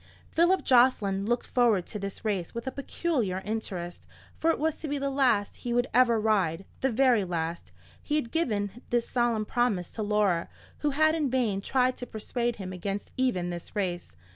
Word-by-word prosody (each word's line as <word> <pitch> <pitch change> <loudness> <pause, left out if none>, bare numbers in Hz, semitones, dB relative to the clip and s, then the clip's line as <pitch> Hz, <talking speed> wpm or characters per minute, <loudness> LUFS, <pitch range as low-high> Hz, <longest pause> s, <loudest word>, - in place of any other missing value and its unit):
Philip 345 +3 +3
Jocelyn 220 -6 +3
looked 240 +1 0
forward 230 -7 +2
to 210 - -5
this 200 +3 -6
race 195 -2 -2
with 235 - -4
a 265 - -2
peculiar 265 - -1
interest, 190 -5 -4 0.3
for 325 - +1
it 330 - +2
was 315 +1 0
to 315 - -6
be 290 0 -1
the 275 0 -1
last 255 -7 +2
he 240 - -3
would 245 0 +3
ever 235 -2 +5
ride—the 200 +2 0
very 245 -3 +3
last: 170 -2 -3 0.3
he 295 - -2
had 265 -6 -1
given 220 - -1
this 240 -1 +1
solemn 240 -3 +1
promise 215 -7 0
to 220 - -5
Laura, 205 -5 +1 0.3
who 295 - +1
had 310 +2 +3
in 305 -4 0
vain 235 -6 0
tried 255 +3 +1
to 245 - -6
persuade 235 +2 -2
him 185 -2 -6
against 195 +2 -4
even 185 -9 0
this 175 +4 -7
race. 175 - -3
230 Hz, 185 wpm, -28 LUFS, 195-260 Hz, 0.3 s, ever